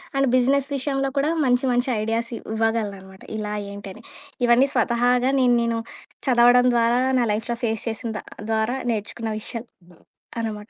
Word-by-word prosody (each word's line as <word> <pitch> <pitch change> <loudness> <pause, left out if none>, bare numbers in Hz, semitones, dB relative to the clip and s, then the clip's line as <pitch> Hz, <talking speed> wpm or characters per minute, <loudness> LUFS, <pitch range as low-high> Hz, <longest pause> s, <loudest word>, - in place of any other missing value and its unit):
And 275 0 +2
business 270 +2 +2
విషయంలో 275 0 -1
కూడా 280 +2 +2 0.2
మంచి 250 +1 +2
మంచి 245 +2 +1
ఐడియాస్ 225 +2 -1
ఇవ్వగలనన్నమాట 210 -4 -3
ఇలా 210 -1 -3 0.2
ఏంటని. 200 +2 -9 0.4
ఇవన్నీ 245 +3 +4
స్వతహాగా 245 +1 +2
నేను 250 -2 +4
నేను 230 0 0 0.5
చదవడం 245 0 +5
ద్వారా, 235 +1 +3 0.2
నా 240 - +2
లైఫ్‍లో 230 +3 -3
ఫేస్ 225 -2 0
చేసిన 225 +1 -4
ద - - -7 0.3
ద్వారా 220 +3 0
నేర్చుకున్న 220 +1 -3
విషయాలు 230 +2 -5 0.7
అనమాట. 215 -1 -5
235 Hz, 140 wpm, -23 LUFS, 220-250 Hz, 0.7 s, చదవడం